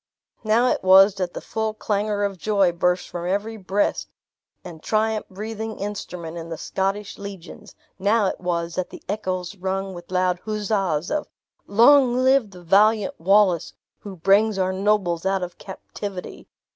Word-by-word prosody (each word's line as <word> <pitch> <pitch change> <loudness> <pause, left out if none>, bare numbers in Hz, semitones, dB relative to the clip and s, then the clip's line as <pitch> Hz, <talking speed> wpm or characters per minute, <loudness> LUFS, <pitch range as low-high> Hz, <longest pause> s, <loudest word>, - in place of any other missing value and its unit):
Now 225 +3 +3
it 255 - +1
was 190 +2 +7
that 185 -2 -4
the - - -5
full 220 -1 -3
clangor 205 -1 -1
of 200 -2 -2
joy 200 -3 +2
burst 180 +1 0
from 175 0 -5
every 205 +4 -2
breast 200 0 -1 0.5
and 165 -3 -10
triumph 215 +2 0
breathing 220 +2 -6
instrument 180 -5 -6
in 165 0 -8
the 165 - -5
Scottish 195 +4 -3
legions; 195 -3 -10 0.2
now 205 +2 +2
it 190 - -2
was 170 -2 -2
that 185 +1 -3
the - - -12
echoes 185 -2 -3
rung 190 0 -3
with 175 -1 -11
loud 180 -1 +1
huzzas 195 -7 -1
of 300 0 -1 0.4
"Long 245 +4 +5
live 260 -3 +3
the 180 -2 -14
valiant 205 +4 +3
Wallace, 190 -1 +3 0.3
who 200 -2 -9
brings 200 +4 +3
our 185 0 0
nobles 190 -4 0
out 190 -1 0
of 180 0 -7
captivity! 190 0 -8
195 Hz, 160 wpm, -23 LUFS, 180-215 Hz, 0.5 s, was